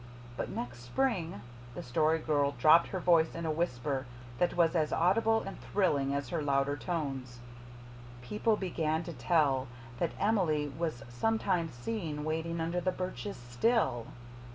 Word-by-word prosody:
But -, -, -3 dB
next 120 Hz, 0 st, -5 dB
spring" 165 Hz, -, -1 dB, 0.3 s
the -, -, -5 dB
Story 155 Hz, +5 st, +2 dB
Girl 145 Hz, -3 st, +1 dB
dropped 155 Hz, +6 st, +6 dB
her 190 Hz, -, -3 dB
voice 170 Hz, -2 st, +4 dB
to 170 Hz, 0 st, -5 dB
a -, -, +1 dB
whisper 140 Hz, -4 st, -1 dB, 0.3 s
that 175 Hz, 0 st, +1 dB
was 165 Hz, -2 st, +4 dB
as 155 Hz, -2 st, +1 dB
audible 225 Hz, +6 st, +3 dB
and 195 Hz, -, -7 dB
thrilling 145 Hz, -9 st, +1 dB
as 140 Hz, -3 st, -3 dB
her 165 Hz, -, -1 dB
louder 140 Hz, 0 st, +1 dB
tones 135 Hz, -7 st, -4 dB, 0.9 s
"people 210 Hz, -, +1 dB
began 160 Hz, -4 st, -1 dB
to 170 Hz, -, -6 dB
tell 135 Hz, -1 st, +2 dB, 0.3 s
that -, -, 0 dB
Emily 170 Hz, -9 st, +2 dB
was 160 Hz, -7 st, -3 dB
sometimes 175 Hz, -, 0 dB
seen 155 Hz, -, -4 dB
waiting 160 Hz, +2 st, -2 dB
under 170 Hz, +2 st, -1 dB
the 185 Hz, +1 st, +1 dB
birches 185 Hz, +3 st, -5 dB
still. 120 Hz, -, 0 dB
160 Hz, 150 wpm, -31 LUFS, 140-180 Hz, 0.9 s, dropped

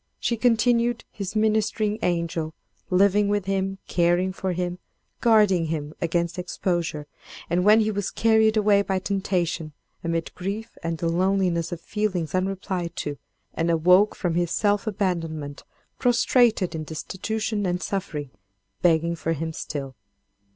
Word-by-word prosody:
She 235 Hz, -, 0 dB
continued 235 Hz, 0 st, +2 dB
his 200 Hz, -1 st, -6 dB
ministering 215 Hz, 0 st, +1 dB
angel—living 180 Hz, +4 st, 0 dB
with 205 Hz, -1 st, 0 dB
him, 195 Hz, 0 st, -1 dB
caring 175 Hz, +2 st, +2 dB
for 190 Hz, 0 st, -2 dB
him, 180 Hz, 0 st, -3 dB, 0.4 s
guarding 210 Hz, -7 st, +4 dB
him 155 Hz, -2 st, -3 dB
against 170 Hz, +1 st, -1 dB
exposure, 175 Hz, -4 st, -2 dB, 0.5 s
and 175 Hz, +1 st, +2 dB
when 215 Hz, +3 st, +6 dB
he 215 Hz, 0 st, +1 dB
was 205 Hz, -2 st, -2 dB
carried 220 Hz, -1 st, +3 dB
away 205 Hz, -1 st, +4 dB
by 195 Hz, -1 st, -1 dB
temptation, 185 Hz, -5 st, -1 dB, 0.3 s
amid 165 Hz, -1 st, -2 dB
grief 205 Hz, +5 st, -5 dB
and 165 Hz, 0 st, -2 dB
the 165 Hz, -, -2 dB
loneliness 180 Hz, -1 st, +1 dB
of 175 Hz, -, -5 dB
feelings 185 Hz, -7 st, -2 dB
unreplied 185 Hz, -2 st, -2 dB
to, 145 Hz, -1 st, -4 dB, 0.3 s
and 165 Hz, +1 st, -1 dB
awoke 180 Hz, +5 st, +4 dB
from 175 Hz, -3 st, -1 dB
his 175 Hz, 0 st, +1 dB
self 205 Hz, +4 st, +1 dB
abandonment 165 Hz, -8 st, -2 dB, 0.4 s
prostrated 240 Hz, -5 st, +3 dB
in 160 Hz, -1 st, -4 dB
destitution 205 Hz, +6 st, -3 dB
and 180 Hz, +1 st, -1 dB
suffering, 155 Hz, -8 st, -4 dB, 0.5 s
begging 170 Hz, 0 st, +3 dB
for 165 Hz, 0 st, -1 dB
him 160 Hz, +1 st, -4 dB
still. 140 Hz, -4 st, -5 dB
185 Hz, 135 wpm, -25 LUFS, 165-210 Hz, 0.5 s, when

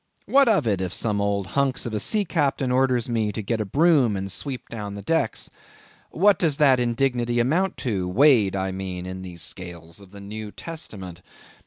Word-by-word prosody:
What 275 Hz, 0 st, +4 dB
of 205 Hz, -, +3 dB
it, 100 Hz, -4 st, 0 dB
if 90 Hz, -2 st, -3 dB
some 105 Hz, -3 st, 0 dB
old 100 Hz, -1 st, 0 dB
hunks 135 Hz, +5 st, 0 dB
of 120 Hz, -, -4 dB
a 105 Hz, -, 0 dB
sea 210 Hz, -, +1 dB
captain 140 Hz, -6 st, 0 dB
orders 125 Hz, -2 st, +2 dB
me 110 Hz, -3 st, 0 dB
to 110 Hz, -, -3 dB
get 110 Hz, +2 st, -1 dB
a -, -, -2 dB
broom 140 Hz, -, +3 dB
and 95 Hz, 0 st, -4 dB
sweep 130 Hz, +5 st, -5 dB
down 105 Hz, -3 st, -6 dB
the 100 Hz, -, -8 dB
decks? 160 Hz, -3 st, 0 dB, 0.6 s
What 200 Hz, +4 st, +3 dB
does 155 Hz, -5 st, +2 dB
that 135 Hz, -4 st, +5 dB
indignity 120 Hz, 0 st, 0 dB
amount 165 Hz, +11 st, +1 dB
to, 100 Hz, -7 st, -1 dB
weighed, 115 Hz, -3 st, +4 dB
I 95 Hz, 0 st, -1 dB
mean, 95 Hz, -1 st, -5 dB
in 95 Hz, 0 st, -6 dB
the 90 Hz, -2 st, -9 dB
scales 85 Hz, +1 st, -6 dB
of 100 Hz, -, -15 dB
the 100 Hz, +1 st, -12 dB
New 105 Hz, +1 st, -7 dB
Testament? 95 Hz, -, -7 dB
110 Hz, 195 wpm, -24 LUFS, 95-135 Hz, 0.6 s, that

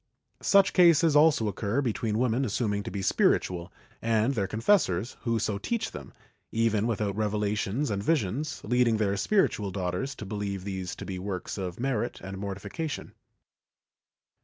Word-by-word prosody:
Such 200 Hz, -1 st, +4 dB
cases 170 Hz, -3 st, +5 dB
also 150 Hz, -7 st, +5 dB
occur 105 Hz, +4 st, -1 dB
between 115 Hz, -4 st, -1 dB
women 125 Hz, +2 st, +1 dB
assuming 105 Hz, -3 st, -1 dB
to -, -, -6 dB
be 100 Hz, -1 st, -4 dB
spiritual 90 Hz, -2 st, +1 dB, 0.3 s
and 115 Hz, +3 st, +2 dB
their 100 Hz, -6 st, -1 dB
con 110 Hz, -, -4 dB
fessors, 115 Hz, -, +2 dB
who 115 Hz, -1 st, +1 dB
so 105 Hz, -2 st, -1 dB
teach 225 Hz, -, -2 dB
them, -, -, -9 dB, 0.4 s
even 115 Hz, -1 st, +1 dB
without 105 Hz, -4 st, -1 dB
revelations 105 Hz, +4 st, -1 dB
and 100 Hz, -1 st, -1 dB
visions, 150 Hz, -, -1 dB
leading 120 Hz, -1 st, +2 dB
their 100 Hz, -2 st, +1 dB
spiritual 105 Hz, -, +1 dB
daughters 95 Hz, +8 st, -3 dB
to 105 Hz, -, -7 dB
believe 100 Hz, -1 st, -4 dB
these 95 Hz, -2 st, -4 dB
to -, -, -8 dB
be 95 Hz, -2 st, -5 dB
works 95 Hz, -1 st, -4 dB
of 90 Hz, 0 st, -5 dB
merit 120 Hz, -3 st, -1 dB
and 95 Hz, +1 st, -7 dB
mortification. 100 Hz, -, -5 dB
110 Hz, 155 wpm, -28 LUFS, 100-130 Hz, 0.4 s, cases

